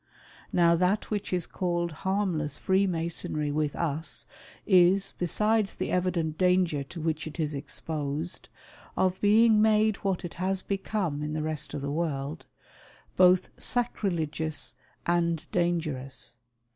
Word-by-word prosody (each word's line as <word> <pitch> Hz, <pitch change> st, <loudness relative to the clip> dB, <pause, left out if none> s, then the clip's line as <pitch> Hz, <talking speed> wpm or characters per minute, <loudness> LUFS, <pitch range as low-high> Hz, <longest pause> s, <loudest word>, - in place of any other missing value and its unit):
Now 170 Hz, -1 st, +4 dB
that 185 Hz, +6 st, +1 dB
which 205 Hz, -2 st, -2 dB
is 180 Hz, -2 st, 0 dB
called 175 Hz, -2 st, -1 dB
harmless 170 Hz, -4 st, -1 dB
Freemasonry 170 Hz, -5 st, 0 dB
with 150 Hz, -1 st, -1 dB
us, 160 Hz, -1 st, -2 dB, 0.4 s
is, 190 Hz, 0 st, +4 dB
besides 210 Hz, +4 st, +1 dB
the -, -, -3 dB
evident 175 Hz, -4 st, 0 dB
danger 180 Hz, -5 st, +3 dB
to 165 Hz, +5 st, -9 dB
which 160 Hz, 0 st, -2 dB
it 155 Hz, +2 st, -9 dB
is 155 Hz, -2 st, -1 dB
exposed, 150 Hz, +3 st, -4 dB, 0.5 s
of 185 Hz, 0 st, +1 dB
being 215 Hz, +1 st, +5 dB
made 215 Hz, -1 st, +4 dB
what 190 Hz, -3 st, -2 dB
it 170 Hz, -, -6 dB
has 190 Hz, 0 st, 0 dB
become 195 Hz, -6 st, -2 dB
in 150 Hz, 0 st, -3 dB
the 155 Hz, 0 st, -2 dB
rest 155 Hz, -2 st, -3 dB
of 140 Hz, -, -4 dB
the 140 Hz, -, -2 dB
world, 150 Hz, -1 st, -3 dB, 0.7 s
both 185 Hz, 0 st, +5 dB
sacrilegious 160 Hz, -, 0 dB, 0.3 s
and 170 Hz, -1 st, +1 dB
dangerous. 155 Hz, -8 st, -1 dB
170 Hz, 130 wpm, -28 LUFS, 155-190 Hz, 0.7 s, being